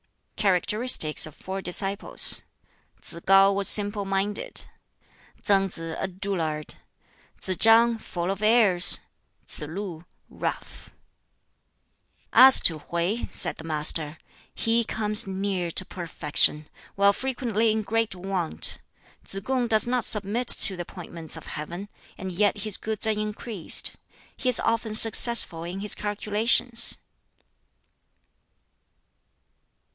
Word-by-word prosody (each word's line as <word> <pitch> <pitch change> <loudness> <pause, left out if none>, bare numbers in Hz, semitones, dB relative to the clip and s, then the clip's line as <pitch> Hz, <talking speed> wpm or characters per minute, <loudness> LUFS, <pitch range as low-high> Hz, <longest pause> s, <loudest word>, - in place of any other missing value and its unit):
Characteristics 200 -4 -1
of 155 - -14
four 190 +1 -8
disciples: 195 +3 0 0.6
Tsz - - -6
kŠu 195 +1 +3
was 200 0 -3
simple 205 0 +4
minded; 195 +1 -2 0.8
Tsang 195 -1 +1
Si, 165 -2 -9
a - - -4
dullard; 175 -5 -5 0.7
Tsz 185 - -4
chang, 225 +1 +3
full 175 -3 -5
of 195 +1 -7
airs; 215 -5 +4 0.4
Tsz - - -2
lu, 175 -1 -8 0.2
rough. - - -8 1.4
"As 260 0 +7
to 160 -3 +2
Hwķi," 170 +9 -4
said - - +2
the - - -11
Master, 155 0 -1 0.4
"he 230 +1 0
comes 215 -2 -1
near 190 -2 -4
to 185 +3 -3
perfection, 155 -3 -1 0.3
while 200 0 +2
frequently 235 -3 -2
in 215 0 -3
great 225 -1 -3
want. 185 -2 -5 0.4
Tsz 195 - -7
kung 255 -2 -2
does 220 -1 +1
not 245 0 -2
submit 210 +4 +1
to 195 - +11
the 175 - -7
appointments 170 -2 -10
of - - -12
Heaven; 175 +6 -8 0.3
and 190 0 -7
yet 205 +3 -1
his 210 -1 -2
goods 220 0 -2
are 220 - 0
increased; 210 -2 -3 0.4
he 255 - -3
is 250 - +5
often 225 -1 -2
successful 225 -6 +4
in 180 +3 -7
his 210 - +1
calculations." 215 +3 0
200 Hz, 120 wpm, -23 LUFS, 180-220 Hz, 1.4 s, to